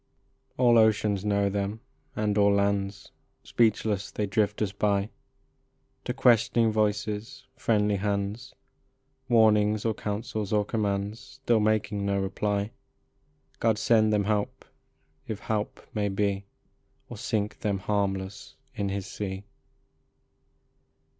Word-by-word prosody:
All 120 -2 +5
oceans 105 -3 +2
know 100 -1 +2
them, 100 +2 -2 0.4
and 105 -1 0
all 100 -1 +4
lands. 100 0 0 0.3
Speechless 105 -3 +1
they 105 - -2
drift 105 +1 0
us 100 - -2
by; 100 0 0 0.9
To - - -1
questioning 115 -1 +4
voices, 105 +3 -1
friendly 105 -4 +1
hands, 100 +4 -3 0.7
Warnings 110 -2 +4
or 110 - +2
counsels 105 -1 -4
or 105 -1 +2
commands, 105 0 -2 0.2
Still 115 -2 +3
making 105 -1 0
no 100 0 0
reply. 100 +2 -1 0.9
God 110 -2 +2
send 110 -1 +3
them 105 -1 +2
help 105 0 -2 0.6
if 105 -2 -5
help 105 -1 -3
may 105 -1 0
be, 100 0 -1 0.6
Or - - -8
sink 105 -1 -2
them 100 -2 -1
harmless 100 0 -2 0.2
in 100 -1 -2
his 100 -1 -3
sea. 100 -1 -5
105 Hz, 115 wpm, -27 LUFS, 100-110 Hz, 0.9 s, All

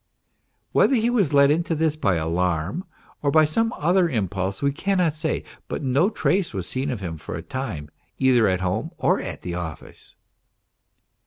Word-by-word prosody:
Whether 270 - +4
he 235 0 +2
was 205 - +2
led 140 0 +5
into 165 +2 0
this 155 -1 +1
by 100 - +1
alarm 85 - -1 0.4
or 155 +2 +4
some 225 +10 +1
other 175 +3 +3
impulse 95 - -2
we 140 0 +1
cannot 180 -1 +1
say, 155 - -1 0.2
but - - -4
no 140 +8 +3
trace 190 - 0
was 95 -3 -3
seen 130 +2 -2
of 120 -6 -3
him 85 -4 -5
for 80 - -6
a 80 - -6
time 85 - -5 0.3
either 125 -4 +4
at 95 -1 +1
home 90 0 -1
or - - +2
at - - -6
the 90 - -4
office. 85 -3 -7
135 Hz, 170 wpm, -23 LUFS, -, 0.4 s, led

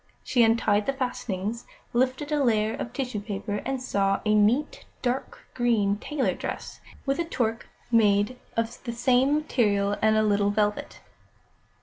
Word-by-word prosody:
She 245 - +2
untied 225 -2 +3
the 275 - +1
fastenings, 235 -4 -3 0.3
lifted 260 +4 0
a 295 -2 +2
layer 220 -3 +2
of 235 - -5
tissue 250 -4 -3
paper, 205 0 -4
and 270 0 -2
saw 195 -5 0
a 215 - +3
neat, 220 +8 +2 0.2
dark 250 +1 -3
green 220 -5 +2
tailor 285 +4 -1
dress, - - -6 0.3
with 275 +2 0
a 340 - 0
toque 230 -8 -2 0.2
made 210 +1 +3 0.2
of 230 +1 -2
the 235 - -3
same 255 +4 +3
material 205 -9 +1
and 220 0 +4
a 215 - +3
little 205 -1 +2
velvet. 205 0 -1
230 Hz, 150 wpm, -26 LUFS, 205-255 Hz, 0.3 s, and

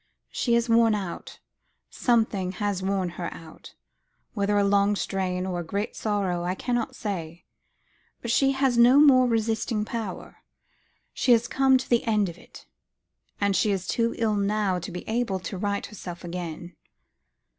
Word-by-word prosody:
"She 235 -2 +1
is 235 0 +1
worn 230 -1 +4
out; 190 -4 -6 0.5
something 220 -6 +1
has 200 -1 -2
worn 190 -1 -1
her 170 - -3
out; 160 -1 -13 0.6
whether 205 -1 0
a 205 - +3
long 200 +1 +3
strain, 185 -2 -2
or 180 -2 -3
a - - -3
great 200 +6 -3
sorrow, 195 -5 -1
I 180 +1 -1
cannot 240 +2 -2
say. 175 -5 -5 0.7
But 235 - -3
she 275 +2 +3
has 265 -3 +1
no 245 +4 +7
more 260 -4 +6
resisting 225 -1 0
power; 220 -5 -6 0.8
she 245 - +3
has 235 0 +2
come 265 0 +4
to 260 - -6
the 240 -1 +2
end 210 -4 +1
of 170 - -11
it - - -15
all. - - -49
And 200 -1 +2
she 215 - +2
is 190 -2 -1
too 230 +3 0
ill 220 -2 +1
now 200 -2 0
to 175 - -7
be 180 - -7
able 225 -3 -1
to 190 - -6
right 200 +2 -2
herself 180 -4 -9
again." 175 -1 -6
205 Hz, 165 wpm, -26 LUFS, 185-230 Hz, 0.8 s, no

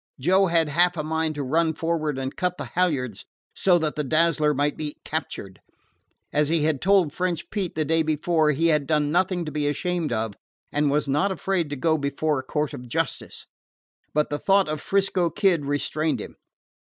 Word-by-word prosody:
Joe 190 +7 +3
had 165 -2 +2
half 175 +4 +2
a 155 - -1
mind 160 0 -1
to 145 - -3
run 160 +4 +1
forward 155 -4 -1
and 135 0 -4
cut 180 -1 -1
the - - -5
halyards 140 - 0 0.3
so 180 -2 +3
that 155 -3 -1
the 150 - -1
Dazzler 155 +1 +2
might 145 +1 0
be 150 -1 -5
captured. 125 -11 -5 0.7
As 150 0 +2
he 165 -2 +2
had 150 -3 0
told 190 -6 +3
French 180 0 -2
Pete 195 -5 -3
the 155 -1 0
day 160 +2 +2
before, 155 0 +1
he 160 +3 +2
had 150 -3 +1
done 150 -1 +1
nothing 180 0 +1
to 155 - -5
be 150 -1 -1
ashamed 170 +2 -1
of, 110 -1 -1 0.4
and 145 0 +1
was 150 +1 +1
not 150 +9 +1
afraid 190 -4 -1
to 145 - -3
go 160 +3 +1
before 140 +1 0
a - - -6
court 150 +2 -2
of 125 - -8
justice. - - -3 0.7
But 150 0 0
the 145 - -1
thought 195 -2 +3
of 155 -1 -3
'Frisco 195 -3 +1
Kid 175 -5 +1
restrained 150 +2 -1
him. - - -8
155 Hz, 195 wpm, -24 LUFS, 145-175 Hz, 0.7 s, Joe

